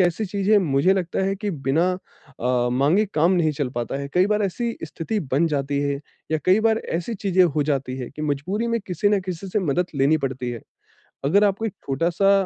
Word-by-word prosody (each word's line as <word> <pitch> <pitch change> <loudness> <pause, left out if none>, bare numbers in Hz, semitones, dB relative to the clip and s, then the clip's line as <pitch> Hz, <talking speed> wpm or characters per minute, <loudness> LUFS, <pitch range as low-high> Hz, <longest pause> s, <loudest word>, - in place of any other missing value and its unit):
ऐसी 180 +4 +2
चीज़ 200 +1 -1
है, 215 - +7
मुझे 160 +1 +3
लगता 180 -1 -1
है 195 0 0
कि 205 +1 -3
बिना 150 +1 +1 0.6
अ, 125 0 +1
माँगे 150 +11 +3
काम 165 +4 +4
नहीं 160 -4 +2
चल 140 -2 -2
पाता 120 +3 -3
है। 140 - -5
कई 180 +2 +4
बार 210 0 +1
ऐसी 230 +5 -1
स्थिति 165 +7 -3
बन 160 +5 +3
जाती 140 -2 -1
है 140 -1 -1 0.3
या 155 - +2
कई 190 +4 +4
बार 220 0 +2 0.2
ऐसी 225 +6 -4
चीज़ें 190 -2 +2
हो 150 -3 +1
जाती 135 -3 -1
है 125 - -5
कि 150 +2 -7
मजबूरी 170 +10 -1
में 230 -1 0
किसी 185 +3 +1
ना 205 -1 +3
किसी 185 +1 -6
से 210 - 0
मदद 180 0 0
लेनी 140 +3 +3
पड़ती 125 -1 -4
है। 120 -2 -6 0.7
अगर 200 +9 +4
आपको 205 +2 +1
एक 215 - -3
छोटा-सा 170 +8 +2
170 Hz, 215 wpm, -23 LUFS, 140-195 Hz, 0.7 s, है